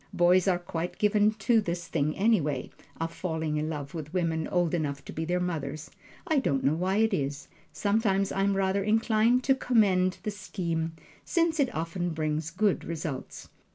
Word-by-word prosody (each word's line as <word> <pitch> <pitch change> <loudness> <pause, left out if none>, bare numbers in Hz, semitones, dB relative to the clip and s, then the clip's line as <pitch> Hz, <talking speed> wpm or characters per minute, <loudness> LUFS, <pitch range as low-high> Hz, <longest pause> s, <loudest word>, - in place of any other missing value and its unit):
Boys 175 +2 +4
are 185 -2 +3
quite 175 0 -5
given 210 0 +3
to 220 +2 +2
this 175 -3 -4
thing, 155 -2 -1
anyway, 170 - +1 0.3
of 165 0 -3
falling 160 -4 -2
in 155 +1 -1
love 145 -3 -5
with 155 -3 -6
women 165 -3 0
old 175 -2 +1
enough 145 -4 -2
to - - -8
be 160 - -3
their 180 +2 0
mothers 155 -4 -4 0.3
I 315 -5 +2
don't 135 - 0
know 140 - +3
why 185 +4 0
it 220 0 +3
is. 140 -4 -2 0.2
Sometimes 200 -2 +1
I 195 - -1
am 195 0 +2
rather 195 +1 +1
inclined 225 +3 +3
to 270 - +4
commend 200 -8 +2
the 210 - -2
scheme, 170 -5 -3 0.3
since 335 -2 +1
it 270 -3 +2
often 165 +1 -2
brings 155 0 -1
good 195 +3 +1
results. 155 -5 -5
175 Hz, 180 wpm, -28 LUFS, 160-205 Hz, 0.3 s, Boys